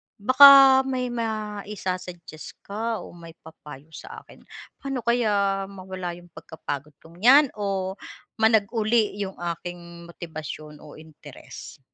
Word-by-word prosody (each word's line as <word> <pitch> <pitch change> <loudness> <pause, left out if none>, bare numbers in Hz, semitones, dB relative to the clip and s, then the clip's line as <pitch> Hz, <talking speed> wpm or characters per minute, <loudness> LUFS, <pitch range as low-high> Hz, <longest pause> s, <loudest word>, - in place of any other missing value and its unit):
baka 265 +3 +7
may 255 -2 -3
maisa-suggest 205 -7 -6
ka 220 +2 -4
o - - -12
may 165 -1 -14
papayo 150 -2 -14
sa - - -11
akin - - -18 0.4
paano 270 -3 -5
kaya 200 -5 0
mawala 185 -2 -7
yung 175 0 -17
pagkapagod 145 -2 -8
kong 165 +2 -17
yan 270 +6 +5
o 195 -2 -4 0.4
managuli 220 -1 +4 0.6
yung 195 -2 -5
aking 170 0 -8
motibasyon 155 -3 -9
o 150 - -14
interes? 155 -2 -13
190 Hz, 115 wpm, -24 LUFS, 170-225 Hz, 0.6 s, baka